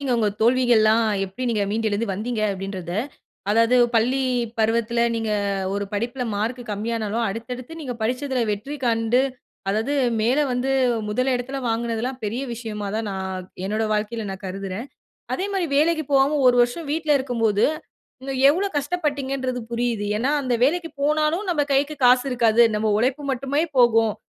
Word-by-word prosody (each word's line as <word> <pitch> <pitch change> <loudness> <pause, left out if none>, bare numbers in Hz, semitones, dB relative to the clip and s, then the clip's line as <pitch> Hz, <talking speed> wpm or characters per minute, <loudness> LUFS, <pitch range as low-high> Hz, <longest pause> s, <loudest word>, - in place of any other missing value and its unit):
நீங்க 270 -3 -1
உங்க 220 -2 +2
தோல்விகள்லாம் 230 -2 +4 0.2
எப்டி 195 +7 -8
நீங்க 215 -3 +1
மீண்டு 220 +1 0
எழுந்து 210 +2 -1
வந்தீங்க 215 +4 -3
அப்டின்றத. 190 -2 -5 0.6
அதாவது 230 +3 +4 0.2
பள்ளி 245 +4 +2 0.4
பருவத்துல 230 +1 +2
நீங்க 225 -1 -2 0.4
ஒரு 200 0 -2
படிப்புல 240 +5 -2
மார்க் 230 +5 -2
கம்மியா 225 +3 -2
ஆனாலும் 220 +2 -1
அடுத்தடுத்து 245 +8 -7
நீங்க 265 -6 -4
படிச்சதுல 250 +2 0
வெற்றி 210 +9 -4
காண்டு. 230 +1 +2 0.5
அதாது 220 +8 0 0.3
மேல 245 +6 +2
வந்து 250 +2 0 0.4
முதல் 255 +5 +1
இடத்துல 265 +3 -4
வாங்குனதெல்லாம் 235 +2 -2
பெரிய 225 +5 -2
விஷயமா 215 -3 -5
தான் 220 -1 -2
நான் 190 -1 -5 0.2
என்னோட 215 +3 -1
வாழ்க்கையில 215 +1 -2
நான் 190 0 -9
கருதுறேன். 195 +5 -5 0.5
அதேமாரி 390 -1 -1
வேலைக்கு 315 +1 +2
போவாம 275 +2 +4
1 245 - +5
வருஷம் 280 +6 -4
வீட்ல 310 -1 0
இருக்கும்போது 225 -5 +1 0.6
நீங்க 270 0 -4 0.2
எவ்வளோ 370 +7 +1
கஷ்டப்பட்டீங்கன்றது 275 -5 -2
புரியுது. 235 -3 -1
ஏனா 250 +5 0
அந்த 255 -2 0
வேலைக்கு 330 +3 0
போனாலும் 305 +6 +1
நம்ம 300 -4 +1
கைக்கு 285 +3 +1
காசு 250 +1 +5
இருக்காது 235 -2 +3
நம்ம 215 0 +1
உழைப்பு 265 +4 0
மட்டுமே 275 +4 -1 0.2
போகும். 225 -3 +4
240 Hz, 150 wpm, -23 LUFS, 220-270 Hz, 0.6 s, 1